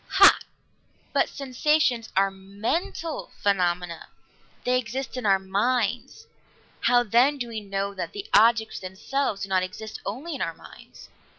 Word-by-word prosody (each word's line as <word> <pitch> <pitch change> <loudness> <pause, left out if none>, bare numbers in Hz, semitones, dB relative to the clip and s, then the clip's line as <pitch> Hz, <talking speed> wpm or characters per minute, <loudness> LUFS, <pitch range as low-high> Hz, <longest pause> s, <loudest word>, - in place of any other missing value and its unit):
"Hah! - - +8 0.7
But - - +2
sensations 265 -3 +1
are 195 0 +4
mental 210 - -3
phenomena. 180 -3 0 0.6
They 250 0 +2
exist 255 +3 -5
in 250 -4 -2
our 195 -1 +5
minds. 225 - -1 0.5
How, 245 0 +4
then, 245 +6 +3
do 245 -3 -4
we 220 -2 -5
know 200 0 -3
that 190 - -5
the 405 0 -6
objects 225 -1 +4
themselves 200 +4 -2
do 195 - -5
not 190 -1 +3
exist 215 +4 -6
only 275 +11 -5
in 275 - -5
our 165 -1 -2
minds?" - - -15
220 Hz, 140 wpm, -25 LUFS, 195-255 Hz, 0.7 s, Hah